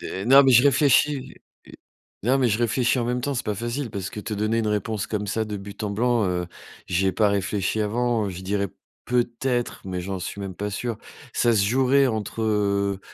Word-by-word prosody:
d 95 Hz, -, -5 dB
non, 135 Hz, +2 st, +8 dB
mais 135 Hz, -, +5 dB
je 120 Hz, +1 st, +7 dB
réfléchis. 140 Hz, 0 st, +3 dB, 0.9 s
Non, 130 Hz, +6 st, +2 dB
mais 125 Hz, -3 st, +3 dB
je 105 Hz, -, +1 dB
réfléchis 120 Hz, +2 st, +1 dB
en 120 Hz, -, 0 dB
même 125 Hz, +1 st, -1 dB
temps, 140 Hz, +2 st, -2 dB
c'est 120 Hz, -, -3 dB
pas 105 Hz, -, 0 dB
facile 120 Hz, +3 st, -3 dB
parce 100 Hz, -1 st, -5 dB
que 105 Hz, -, -6 dB
te 105 Hz, 0 st, -4 dB
donner 110 Hz, +2 st, 0 dB
une 115 Hz, -, 0 dB
réponse 105 Hz, 0 st, -2 dB
comme 105 Hz, -1 st, -3 dB
ça 110 Hz, +2 st, -1 dB
de 105 Hz, -1 st, -5 dB
but 100 Hz, +2 st, -9 dB
en 100 Hz, -, -2 dB
blanc, 120 Hz, +2 st, +1 dB
heu, 90 Hz, -1 st, -1 dB, 0.4 s
j'y 95 Hz, +2 st, +1 dB
ai 95 Hz, -, +2 dB
pas 105 Hz, +2 st, +3 dB
réfléchi 100 Hz, +1 st, -1 dB
avant, 115 Hz, 0 st, 0 dB
heu, -, -, -3 dB
je 90 Hz, 0 st, -8 dB
dirais 100 Hz, +1 st, -1 dB, 0.4 s
peut-être, 120 Hz, 0 st, -1 dB
mais 90 Hz, -1 st, -4 dB
j'en 95 Hz, +1 st, -4 dB
suis 100 Hz, +2 st, -5 dB
même 95 Hz, -2 st, -5 dB
pas 105 Hz, +3 st, -4 dB
sûr. 115 Hz, +2 st, -4 dB, 0.3 s
Ça 120 Hz, -, +2 dB
se 100 Hz, -, +3 dB
jouerait 130 Hz, +5 st, +3 dB
entre, 110 Hz, 0 st, -3 dB
heu, 100 Hz, -2 st, 0 dB
110 Hz, 220 wpm, -24 LUFS, 100-120 Hz, 0.9 s, non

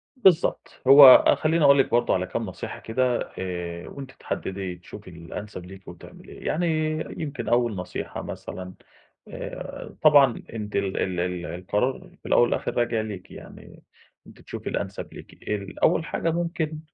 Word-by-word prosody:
بالضبط، 190 Hz, -9 st, +2 dB
هو 140 Hz, +1 st, +11 dB
أ -, -, +5 dB
خلّيني 160 Hz, +1 st, +1 dB
اقول 140 Hz, -1 st, +6 dB
لِك 135 Hz, -, +3 dB
برضو 120 Hz, -, +2 dB
على 90 Hz, 0 st, 0 dB
كام 115 Hz, -, -3 dB
نصيحة 95 Hz, -, -7 dB
كده 125 Hz, +2 st, -1 dB
آآ، 90 Hz, -2 st, -5 dB
وأنتِ 135 Hz, -2 st, -9 dB
تحددي 95 Hz, -6 st, -5 dB
تشوفي 90 Hz, +3 st, -12 dB
الأنسب 90 Hz, +3 st, -8 dB
ليكِ 95 Hz, +1 st, -13 dB
وتعمليه، 90 Hz, -, -12 dB
يعني 175 Hz, +2 st, 0 dB, 0.5 s
يمكن 150 Hz, -2 st, -5 dB
أول 120 Hz, -2 st, +2 dB
نصيحة 90 Hz, 0 st, -5 dB
مثلًا 95 Hz, 0 st, -7 dB, 0.5 s
آآ -, -, -8 dB
طبعًا 145 Hz, -5 st, +5 dB
أنتِ 105 Hz, -2 st, -6 dB
ال 100 Hz, -1 st, -1 dB
ال 90 Hz, -2 st, -1 dB
ال 90 Hz, 0 st, -2 dB
القرار 105 Hz, +10 st, -2 dB
الأول -, -, +4 dB
والآخر 120 Hz, -, -1 dB
راجع 120 Hz, -2 st, +1 dB
ليكِ 105 Hz, -4 st, -8 dB
يعني -, -, -13 dB, 0.4 s
أنتِ -, -, -16 dB
تشوفي -, -, -7 dB
الأنسب -, -, -5 dB
ليكِ، -, -, -12 dB, 0.2 s
ال 100 Hz, -2 st, -4 dB
أول 160 Hz, -, +3 dB
حاجة 165 Hz, -, -1 dB
ممكن 165 Hz, -2 st, -2 dB
110 Hz, 150 wpm, -25 LUFS, 90-140 Hz, 0.5 s, هو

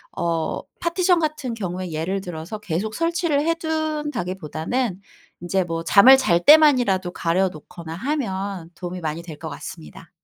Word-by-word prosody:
어 165 Hz, -2 st, -1 dB, 0.2 s
파티션 355 Hz, +1 st, +2 dB
같은 300 Hz, -7 st, -2 dB
경우에 185 Hz, -3 st, -4 dB
예를 185 Hz, +5 st, -2 dB
들어서 175 Hz, +4 st, -7 dB
계속 210 Hz, +3 st, -3 dB
설치를 330 Hz, -3 st, 0 dB
해둔다기보다는 260 Hz, -, -2 dB, 0.4 s
이제 185 Hz, +2 st, 0 dB
뭐 165 Hz, -1 st, -4 dB
잠을 210 Hz, +10 st, +8 dB
잘 175 Hz, -9 st, +2 dB
때만이라도 250 Hz, -, +6 dB
가려 180 Hz, +2 st, +1 dB
놓거나 160 Hz, +1 st, -10 dB
하면 195 Hz, -, -3 dB
도움이 180 Hz, +1 st, -6 dB
많이 160 Hz, +1 st, -4 dB
될 160 Hz, -4 st, -9 dB
것 -, -, -6 dB
같습니다. 75 Hz, -2 st, -10 dB
190 Hz, 320 characters per minute, -22 LUFS, -, 0.4 s, 잠을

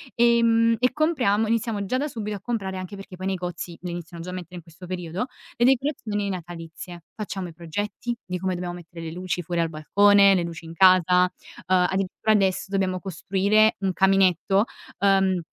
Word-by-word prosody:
Ehm, 230 Hz, -1 st, +4 dB
e 250 Hz, +1 st, +2 dB
compriamo 255 Hz, -9 st, +2 dB
iniziamo 220 Hz, -2 st, -1 dB
già 255 Hz, -, 0 dB
da 290 Hz, +3 st, -1 dB
subito 210 Hz, -5 st, -5 dB
a 190 Hz, -, -15 dB
comprare, 195 Hz, -5 st, -3 dB
anche 185 Hz, +2 st, -6 dB
perché 195 Hz, -1 st, -10 dB
poi 185 Hz, +1 st, -5 dB
i -, -, +1 dB
negozi 175 Hz, -2 st, -5 dB
le 180 Hz, -1 st, -5 dB
iniziano 170 Hz, -1 st, -7 dB
già 180 Hz, -, -6 dB
a -, -, -7 dB
mettere 180 Hz, -1 st, -8 dB
in 175 Hz, -, -7 dB
questo 165 Hz, +2 st, -13 dB
periodo, 180 Hz, +5 st, -4 dB, 0.3 s
le 240 Hz, -, +3 dB
decorazioni 240 Hz, -6 st, 0 dB
natalizie. 175 Hz, -1 st, -8 dB
Facciamo 195 Hz, -4 st, -5 dB
i -, -, -12 dB
progetti 205 Hz, +8 st, -4 dB
di 180 Hz, 0 st, -4 dB
come 185 Hz, 0 st, -1 dB
dobbiamo 175 Hz, 0 st, -4 dB
mettere 165 Hz, -1 st, -10 dB
le 160 Hz, -, -5 dB
luci 180 Hz, +1 st, -3 dB
fuori 170 Hz, +1 st, -1 dB
al 165 Hz, -, 0 dB
balcone, 200 Hz, +6 st, +5 dB
le 185 Hz, -, +2 dB
luci 170 Hz, -1 st, -7 dB
in 165 Hz, -, -9 dB
casa, 180 Hz, 0 st, +5 dB, 0.4 s
uhm, 185 Hz, -1 st, +4 dB
addirittura 195 Hz, +3 st, -1 dB
adesso 195 Hz, -3 st, +2 dB
dobbiamo 190 Hz, -2 st, 0 dB
costruire 200 Hz, +4 st, +2 dB
un 190 Hz, -1 st, 0 dB
caminetto, 195 Hz, +1 st, +3 dB, 0.4 s
uhm, 195 Hz, -2 st, +3 dB
190 Hz, 190 wpm, -24 LUFS, 175-210 Hz, 0.4 s, balcone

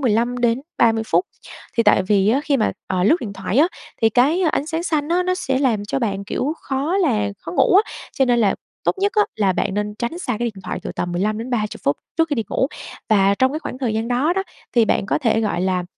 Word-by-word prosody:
15-30 240 Hz, 0 st, +1 dB
phút. 370 Hz, -, +2 dB, 0.5 s
Thì 230 Hz, -, +4 dB
tại 210 Hz, -, +4 dB
vì 195 Hz, +1 st, +2 dB
á 255 Hz, +6 st, +3 dB
khi 280 Hz, -, +2 dB
mà, 215 Hz, -, +1 dB
ờ, 185 Hz, -1 st, 0 dB
lướt 225 Hz, -, +5 dB
điện 205 Hz, -4 st, -5 dB
thoại 195 Hz, +3 st, -3 dB
á 315 Hz, -, +6 dB, 0.4 s
thì 225 Hz, -, +6 dB
cái 285 Hz, -, +3 dB
ánh 285 Hz, -, -1 dB
sáng 325 Hz, +1 st, -2 dB
xanh 305 Hz, -3 st, -1 dB
á 355 Hz, +2 st, +2 dB
nó 365 Hz, 0 st, 0 dB
sẽ 265 Hz, -7 st, -1 dB
làm 230 Hz, -7 st, +1 dB
cho 240 Hz, -, -2 dB
bạn, 200 Hz, -5 st, -2 dB
kiểu, 270 Hz, +8 st, -2 dB
khó 285 Hz, +7 st, -1 dB
là 230 Hz, -, +1 dB
khó 165 Hz, -, -7 dB
ngủ 270 Hz, -, +3 dB
á, -, -, -13 dB, 0.2 s
cho 270 Hz, -, +2 dB
nên 245 Hz, -1 st, +2 dB
là 210 Hz, -4 st, +3 dB, 0.3 s
tốt -, -, +3 dB
nhất 405 Hz, +2 st, +1 dB
á 420 Hz, -, +6 dB
là 200 Hz, -3 st, +2 dB
bạn 190 Hz, +2 st, -1 dB
nên 210 Hz, 0 st, -2 dB
tránh 235 Hz, +9 st, -4 dB
xa 255 Hz, -8 st, -2 dB
cái 240 Hz, -, -1 dB
điện 190 Hz, -, -12 dB
thoại -, -, -3 dB
từ -, -, -5 dB
tầm 175 Hz, 0 st, -3 dB
15-30 215 Hz, +4 st, -2 dB
phút 140 Hz, -, +2 dB, 0.2 s
trước 325 Hz, 0 st, +2 dB
khi 290 Hz, -, 0 dB
đi 225 Hz, -, 0 dB
ngủ. 265 Hz, -, +1 dB, 0.4 s
Và 200 Hz, -2 st, +4 dB
trong 260 Hz, +1 st, +3 dB
cái 310 Hz, -, -2 dB
khoảng 255 Hz, -, -7 dB
thời 240 Hz, -5 st, -1 dB
gian 225 Hz, +2 st, -1 dB
đó 265 Hz, +8 st, +2 dB
đó 385 Hz, -, 0 dB, 0.3 s
thì 235 Hz, -2 st, +5 dB
bạn 195 Hz, -, 0 dB
có -, -, +1 dB
thể, 230 Hz, -6 st, +1 dB
gọi 205 Hz, -5 st, -1 dB
là, 185 Hz, -1 st, 0 dB
235 Hz, 250 wpm, -21 LUFS, 210-285 Hz, 0.5 s, á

